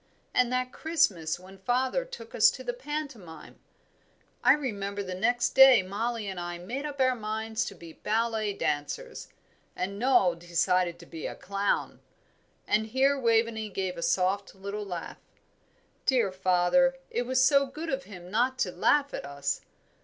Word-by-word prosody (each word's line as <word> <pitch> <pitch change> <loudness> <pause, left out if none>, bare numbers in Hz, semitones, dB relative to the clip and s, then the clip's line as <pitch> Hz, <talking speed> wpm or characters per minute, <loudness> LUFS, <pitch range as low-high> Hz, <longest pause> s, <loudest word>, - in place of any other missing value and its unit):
and 250 -1 +3
that 255 0 -1
Christmas 210 - 0
when 190 +1 -14
father 255 - 0
took - - -10
us - - +6
to - - -7
the - - -2
pantomime! 295 - -7 0.8
I - - +7
remember 205 -8 -3
the 185 -1 -5
next 240 +6 +1
day 265 -6 +8
Mollie 220 +3 -3
and 190 -2 -4
I 175 0 -4
made 250 +12 -5
up 285 -1 -8
our 255 -1 +4
minds 220 -1 -3
to 200 - -7
be 170 -2 -12
ballet 220 0 -1
dancers, 195 - -3 0.5
and 195 +2 -3
Noel 240 -8 +4
decided 175 +1 0
to - - -13
be 160 -2 -6
a - - -6
clown;" 200 +1 -1 0.7
and 215 +1 +1
here 265 +5 +3
Waveney 225 -2 +1
gave 190 -2 -3
a - - -6
soft 195 +3 0
little 200 +2 -5
laugh. 175 -3 -6 0.9
"Dear 240 -7 +3
father, 185 +8 +3 0.2
it 240 0 -1
was 260 0 +3
so 275 +1 +4
good 315 +5 -6
of 270 0 -2
him 180 -3 -11
not 250 +4 +1
to 195 -8 0
laugh 280 +11 +2
at - - -4
us. 140 -1 -3
215 Hz, 160 wpm, -28 LUFS, 185-260 Hz, 0.9 s, day